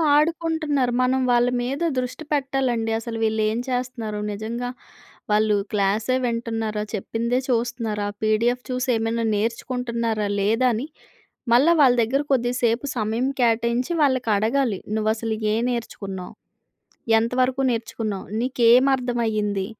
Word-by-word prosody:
ఆడుకుంటున్నారు. 310 Hz, -4 st, +1 dB
మనం 260 Hz, +1 st, +2 dB
వాళ్ళ 240 Hz, 0 st, +4 dB, 0.2 s
మీద 275 Hz, +6 st, -3 dB, 0.2 s
దృష్టి 255 Hz, +5 st, -4 dB
పెట్టాలండి. 260 Hz, -5 st, 0 dB
అసలు 230 Hz, 0 st, -5 dB
వీళ్ళేం 220 Hz, +1 st, +1 dB
చేస్తున్నారు? 245 Hz, -4 st, -3 dB
నిజంగా 230 Hz, +4 st, -4 dB, 0.6 s
వాళ్ళు 215 Hz, 0 st, +3 dB, 0.2 s
క్లాసే 210 Hz, +4 st, +1 dB
వింటున్నారా? 225 Hz, -3 st, -2 dB
చెప్పిందే 235 Hz, +4 st, -1 dB
చూస్తున్నారా? 230 Hz, -3 st, -1 dB
పీడిఎఫ్ 230 Hz, +3 st, +1 dB
చూసి 255 Hz, 0 st, -2 dB
ఏమన్నా 225 Hz, +1 st, -1 dB
నేర్చుకుంటున్నారా? 230 Hz, -1 st, -2 dB
లేదా? 225 Hz, +6 st, +2 dB
అని 230 Hz, +6 st, -2 dB, 0.7 s
మళ్ళా 275 Hz, +8 st, +5 dB
వాళ్ళ 260 Hz, -3 st, +6 dB
దగ్గర 255 Hz, +5 st, +1 dB
కొద్దిసేపు 245 Hz, 0 st, +1 dB
సమయం 225 Hz, +3 st, 0 dB
కేటాయించి 235 Hz, +2 st, +1 dB
వాళ్ళకి 260 Hz, -5 st, +2 dB
అడగాలి. 225 Hz, 0 st, +1 dB, 0.2 s
నువ్వు 215 Hz, 0 st, 0 dB
అసలు 225 Hz, 0 st, -3 dB, 0.2 s
ఏం 225 Hz, -, +1 dB
నేర్చుకున్నావు? 200 Hz, -6 st, -5 dB, 0.9 s
ఎంత 230 Hz, +2 st, -1 dB
వరకు 260 Hz, +1 st, 0 dB
నేర్చుకున్నావు? 225 Hz, -3 st, -3 dB
నీకేం 245 Hz, 0 st, +4 dB
అర్థం 250 Hz, -2 st, -2 dB
అయ్యింది? 205 Hz, -3 st, -1 dB
235 Hz, 120 wpm, -23 LUFS, 220-255 Hz, 0.9 s, వాళ్ళ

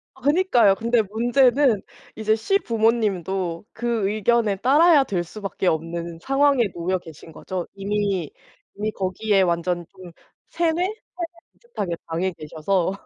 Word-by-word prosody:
아 265 Hz, -, -20 dB
그니까요. 285 Hz, -, +4 dB
근데 230 Hz, +1 st, +1 dB
문제는 240 Hz, +2 st, +2 dB, 0.3 s
이제 220 Hz, 0 st, +1 dB
시부모님도 215 Hz, -, 0 dB
그 230 Hz, -4 st, -1 dB
의견에 215 Hz, 0 st, +1 dB
따라야 290 Hz, -, +5 dB
될 180 Hz, -7 st, -2 dB
수밖에 195 Hz, +1 st, -5 dB
없는 165 Hz, 0 st, -2 dB
상황에 275 Hz, +1 st, +3 dB
놓여 180 Hz, +2 st, -1 dB
계신 160 Hz, -2 st, -13 dB
거죠. 180 Hz, +3 st, -5 dB
이미 200 Hz, -1 st, -1 dB, 0.5 s
이미 210 Hz, +2 st, -2 dB
거기에 195 Hz, +1 st, +1 dB
완전 175 Hz, -1 st, 0 dB
좀 185 Hz, -2 st, -13 dB, 0.4 s
세뇌? 335 Hz, -1 st, +1 dB
세뇌 365 Hz, +4 st, 0 dB, 0.6 s
비슷하게 200 Hz, -, -5 dB
당해 180 Hz, +3 st, -1 dB
계셔서. 170 Hz, +4 st, -1 dB
205 Hz, 285 characters per minute, -23 LUFS, 180-240 Hz, 0.6 s, 따라야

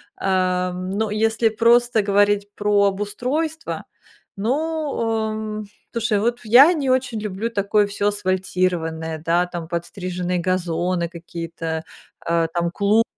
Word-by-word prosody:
А. 185 Hz, -1 st, +1 dB
Но 190 Hz, +4 st, -2 dB
если 220 Hz, +2 st, +2 dB
просто 235 Hz, 0 st, +3 dB
говорить 205 Hz, 0 st, +2 dB
про 205 Hz, 0 st, +2 dB
обустройство, 250 Hz, +11 st, -2 dB, 0.5 s
ну, 220 Hz, +6 st, +1 dB
о, 280 Hz, -8 st, -1 dB
м. 215 Hz, 0 st, -4 dB, 0.3 s
Слушай, 230 Hz, -2 st, 0 dB
вот 235 Hz, +3 st, 0 dB
я 250 Hz, +9 st, +8 dB
не 285 Hz, -5 st, -1 dB
очень 250 Hz, -3 st, 0 dB
люблю 210 Hz, +2 st, -3 dB
такое 205 Hz, -1 st, +2 dB
всё 205 Hz, 0 st, 0 dB
асфальтированное, 180 Hz, -5 st, -1 dB
да, 175 Hz, +2 st, +2 dB
там, 170 Hz, -2 st, -6 dB
подстриженные 180 Hz, +1 st, -3 dB
газоны, 175 Hz, -1 st, -1 dB
какие-то, 165 Hz, -1 st, -5 dB, 0.4 s
э, 165 Hz, 0 st, +2 dB
там, 170 Hz, -1 st, 0 dB
клумбы, 205 Hz, +4 st, +3 dB
205 Hz, 125 wpm, -22 LUFS, 180-225 Hz, 0.5 s, я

